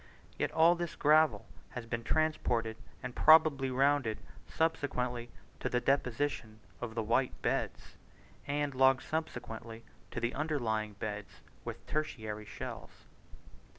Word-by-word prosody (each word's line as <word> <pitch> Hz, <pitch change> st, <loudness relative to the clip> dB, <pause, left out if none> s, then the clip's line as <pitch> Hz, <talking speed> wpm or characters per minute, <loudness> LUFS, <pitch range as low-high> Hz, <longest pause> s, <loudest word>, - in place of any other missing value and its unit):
Yet -, -, -1 dB
all 165 Hz, +2 st, +6 dB
this 175 Hz, -1 st, -4 dB
gravel 150 Hz, -8 st, +4 dB, 0.3 s
has 120 Hz, -, -5 dB
been 115 Hz, 0 st, -3 dB
transported, 120 Hz, -7 st, +1 dB, 0.3 s
and 125 Hz, -, -5 dB
probably 155 Hz, -4 st, +6 dB
rounded, 130 Hz, -3 st, +2 dB, 0.3 s
subsequently 125 Hz, -7 st, -1 dB, 0.3 s
to -, -, -1 dB
the 125 Hz, -, +1 dB
deposition 125 Hz, -4 st, 0 dB, 0.2 s
of 115 Hz, -2 st, -5 dB
the 115 Hz, -, 0 dB
white 120 Hz, +4 st, +1 dB
beds, -, -, -2 dB, 0.5 s
and 145 Hz, 0 st, 0 dB
long 130 Hz, 0 st, +5 dB
subsequently 115 Hz, -7 st, -5 dB, 0.2 s
to -, -, -4 dB
the 120 Hz, +1 st, -1 dB
underlying 115 Hz, -9 st, -1 dB
beds 105 Hz, 0 st, -6 dB, 0.2 s
with -, -, -7 dB
the -, -, -14 dB
tertiary 110 Hz, -9 st, -3 dB
shells. -, -, -7 dB
125 Hz, 125 wpm, -33 LUFS, 115-150 Hz, 0.5 s, all